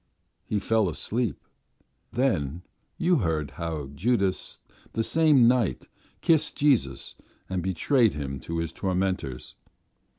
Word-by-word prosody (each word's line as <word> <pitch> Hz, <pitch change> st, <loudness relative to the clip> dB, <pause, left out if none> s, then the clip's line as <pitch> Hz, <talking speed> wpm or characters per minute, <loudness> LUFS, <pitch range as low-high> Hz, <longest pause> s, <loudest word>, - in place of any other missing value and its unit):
He 105 Hz, -, 0 dB
fell 110 Hz, -1 st, +2 dB
asleep. 115 Hz, +8 st, -2 dB, 0.7 s
Then 90 Hz, -, 0 dB, 0.3 s
you 180 Hz, -1 st, +3 dB
heard 80 Hz, -, -1 dB
how 75 Hz, -2 st, -5 dB
Judas 100 Hz, -, 0 dB, 0.3 s
the 115 Hz, -, 0 dB
same 150 Hz, -4 st, +5 dB
night 120 Hz, -5 st, +1 dB, 0.3 s
kissed 155 Hz, -2 st, +2 dB
Jesus 130 Hz, -, +1 dB, 0.3 s
and 95 Hz, -1 st, -2 dB
betrayed 105 Hz, -, +2 dB
Him 70 Hz, -2 st, -4 dB
to 85 Hz, +5 st, -5 dB
His 85 Hz, 0 st, -2 dB
tormentors. 90 Hz, -9 st, -2 dB
95 Hz, 110 wpm, -26 LUFS, 80-125 Hz, 0.7 s, same